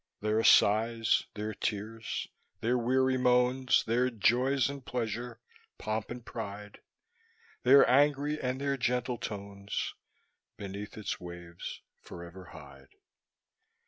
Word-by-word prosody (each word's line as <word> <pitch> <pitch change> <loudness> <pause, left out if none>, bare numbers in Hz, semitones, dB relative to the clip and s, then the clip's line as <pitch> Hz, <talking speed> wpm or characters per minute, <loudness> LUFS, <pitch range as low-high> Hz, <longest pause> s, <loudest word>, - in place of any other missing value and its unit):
Their 110 +1 +1
sighs, 115 +2 +4
their 105 +1 -3
tears, 110 +3 -3 0.3
their 120 +2 +1
weary 130 +2 +2
moans, 125 +1 +3
Their 120 +3 +1
joy 125 +4 +2
and 140 -1 -6
pleasure, 120 0 -4 0.4
pomp 110 0 -3
and 120 -1 -7
pride, 105 -2 -7 0.8
Their 135 +2 +7
angry 145 +3 +3
and 130 +1 -2
their 140 0 -1
gentle 125 -1 -1
tones, 100 -1 -4 0.6
Beneath 100 0 -7
its 110 - -4
waves 85 -1 -8 0.2
forever 85 +2 -10
hide. 70 -5 -14
115 Hz, 110 wpm, -30 LUFS, 105-125 Hz, 0.8 s, Their